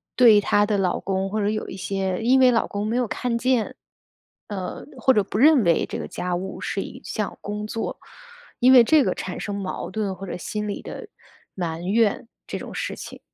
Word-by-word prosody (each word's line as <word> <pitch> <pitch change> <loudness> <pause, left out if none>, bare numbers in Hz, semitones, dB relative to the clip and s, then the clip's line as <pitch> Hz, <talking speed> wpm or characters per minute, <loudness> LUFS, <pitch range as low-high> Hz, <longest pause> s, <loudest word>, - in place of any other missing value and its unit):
对 225 -5 +7
她 205 +1 +3
的 205 -1 0
老 185 -2 0
公 195 0 -2
或 215 +2 -2
者 205 - +1
有 215 0 -2
一 195 - -7
些 190 -1 -2
因 255 +3 +4
为 255 -1 +6
老 230 - +1
公 205 +1 -3
没 230 - -1
有 245 -2 +1
看 235 +1 -2
见， 255 -3 +1 0.7
呃， 190 -3 -5
或 260 +3 +4
者 210 - +4
不 205 - -5
认 290 -4 +6
为 170 -2 +3
这 - - -5
个 - - -5
家 180 0 -3
务 190 +2 -5
是 195 - -2
一 - - -8
项 210 -2 -4
工 210 +1 -4
作， 225 +1 -4 0.6
因 255 +2 +6
为 245 -2 +9
这 300 +3 +5
个 - - 0
产 185 - -5
生 205 -1 -4
矛 195 -2 -4
盾 210 -3 -2
或 195 +2 -8
者 - - -4
心 210 +3 -4
理 200 - -4
的 445 - -8 0.5
埋 165 -3 -3
怨 220 +2 +2 0.2
这 - - -5
种 - - -8
事 - - -3
情。 - - -9
210 Hz, 235 characters per minute, -24 LUFS, 195-235 Hz, 0.7 s, 为